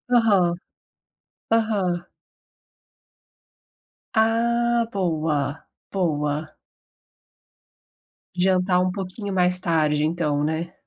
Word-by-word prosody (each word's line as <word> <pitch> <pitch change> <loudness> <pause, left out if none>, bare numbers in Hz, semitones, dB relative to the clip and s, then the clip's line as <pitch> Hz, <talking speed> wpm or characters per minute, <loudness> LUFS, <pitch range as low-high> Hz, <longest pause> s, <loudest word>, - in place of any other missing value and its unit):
Aham. 195 -7 +3 1.0
Aham. 195 -6 +1 2.1
Ah, 235 +1 +2
boa, 155 -6 -1 0.3
boa. 155 -4 -2 1.8
Jantar 180 0 +2
um 185 - +1
pouquinho 195 +1 -5
mais 180 0 +3
tarde 155 -4 +1
então, 155 -3 0
né. 160 +3 -2
180 Hz, 65 wpm, -23 LUFS, 160-200 Hz, 2.1 s, Aham